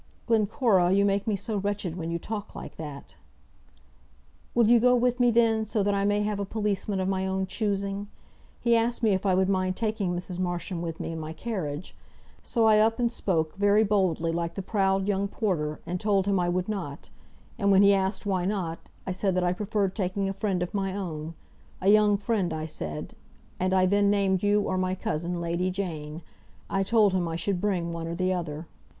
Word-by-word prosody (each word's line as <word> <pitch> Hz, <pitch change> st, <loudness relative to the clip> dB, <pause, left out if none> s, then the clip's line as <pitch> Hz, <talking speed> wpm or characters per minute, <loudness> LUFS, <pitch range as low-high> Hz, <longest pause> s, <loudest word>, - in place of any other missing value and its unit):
"Glencora, 215 Hz, -4 st, +3 dB
you 200 Hz, +1 st, +4 dB
make 200 Hz, +1 st, 0 dB
me 215 Hz, -, +2 dB
so 210 Hz, +2 st, -3 dB
wretched 200 Hz, -4 st, -2 dB
when 165 Hz, -2 st, -4 dB
you 170 Hz, -, -1 dB
talk 210 Hz, +4 st, -6 dB
like -, -, -8 dB
that." 145 Hz, -, -8 dB, 1.4 s
"Will 235 Hz, -2 st, +5 dB
you 240 Hz, +1 st, +6 dB
go 250 Hz, +2 st, +5 dB
with 245 Hz, 0 st, +1 dB
me, 245 Hz, -1 st, +5 dB
then, 225 Hz, -1 st, +3 dB
so 215 Hz, -1 st, 0 dB
that 205 Hz, +1 st, +1 dB
I 200 Hz, 0 st, +1 dB
may 205 Hz, 0 st, +2 dB
have 210 Hz, -1 st, -1 dB
a -, -, 0 dB
policeman 205 Hz, -1 st, -2 dB
of 185 Hz, -, 0 dB
my 190 Hz, 0 st, 0 dB
own 190 Hz, 0 st, -1 dB
choosing? 200 Hz, 0 st, -2 dB, 0.5 s
He 235 Hz, -1 st, +3 dB
asked 235 Hz, +1 st, 0 dB
me 220 Hz, -, +4 dB
if 190 Hz, +1 st, 0 dB
I 185 Hz, -, +3 dB
would 190 Hz, 0 st, +2 dB
mind 185 Hz, -1 st, 0 dB
taking 210 Hz, -5 st, -1 dB
Mrs. 180 Hz, 0 st, -5 dB
Marsham 175 Hz, -1 st, -2 dB
with 165 Hz, -1 st, -5 dB
me -, -, -4 dB
in 165 Hz, -, -5 dB
my 155 Hz, 0 st, -5 dB
carriage. 170 Hz, -5 st, -5 dB, 0.5 s
So 230 Hz, -3 st, +1 dB
I 215 Hz, -1 st, +6 dB
up 225 Hz, +1 st, +3 dB
and 240 Hz, -2 st, +1 dB
spoke, 160 Hz, -9 st, -1 dB
very 205 Hz, +2 st, +4 dB
boldly, 185 Hz, -6 st, +1 dB
like 170 Hz, 0 st, -2 dB
the 195 Hz, -, -4 dB
proud 195 Hz, -1 st, +1 dB
young 200 Hz, -1 st, +1 dB
porter, 165 Hz, -8 st, -2 dB
and 180 Hz, +2 st, -3 dB
told 200 Hz, -2 st, +2 dB
him 200 Hz, -2 st, +2 dB
I 175 Hz, -1 st, +1 dB
would 180 Hz, +1 st, -1 dB
not; 180 Hz, -9 st, -5 dB, 0.5 s
and 200 Hz, -2 st, +2 dB
when 195 Hz, 0 st, +6 dB
he 200 Hz, 0 st, +6 dB
asked 190 Hz, +1 st, 0 dB
why 190 Hz, -3 st, 0 dB
not, 180 Hz, -4 st, -2 dB, 0.3 s
I 185 Hz, -, -2 dB
said 185 Hz, 0 st, 0 dB
that 185 Hz, -, +1 dB
I 175 Hz, 0 st, +2 dB
preferred 200 Hz, 0 st, -1 dB
taking 195 Hz, 0 st, -1 dB
a 195 Hz, -, -2 dB
friend 195 Hz, -3 st, -1 dB
of 180 Hz, -, -6 dB
my 195 Hz, -2 st, -1 dB
own, 165 Hz, -4 st, -5 dB, 0.4 s
a 190 Hz, -, +2 dB
young 210 Hz, -1 st, +5 dB
friend, 200 Hz, -4 st, -1 dB
I 155 Hz, 0 st, -3 dB
said, 80 Hz, -, -5 dB, 0.5 s
and 185 Hz, +1 st, +1 dB
I 185 Hz, -1 st, +4 dB
then 200 Hz, +2 st, +3 dB
named 195 Hz, -2 st, +2 dB
you 205 Hz, 0 st, +3 dB
or 185 Hz, -1 st, -1 dB
my 185 Hz, 0 st, 0 dB
cousin, 175 Hz, -4 st, -3 dB
Lady 170 Hz, +2 st, -1 dB
Jane. 165 Hz, -4 st, -5 dB, 0.5 s
I 195 Hz, -, +1 dB
told 205 Hz, 0 st, +3 dB
him 180 Hz, -2 st, 0 dB
I 165 Hz, -, -3 dB
should 175 Hz, +2 st, -1 dB
bring 180 Hz, -5 st, -1 dB
one 165 Hz, 0 st, -4 dB
or 170 Hz, -, -3 dB
the 185 Hz, +1 st, +1 dB
other." 165 Hz, -3 st, -4 dB
195 Hz, 215 wpm, -27 LUFS, 175-205 Hz, 1.4 s, you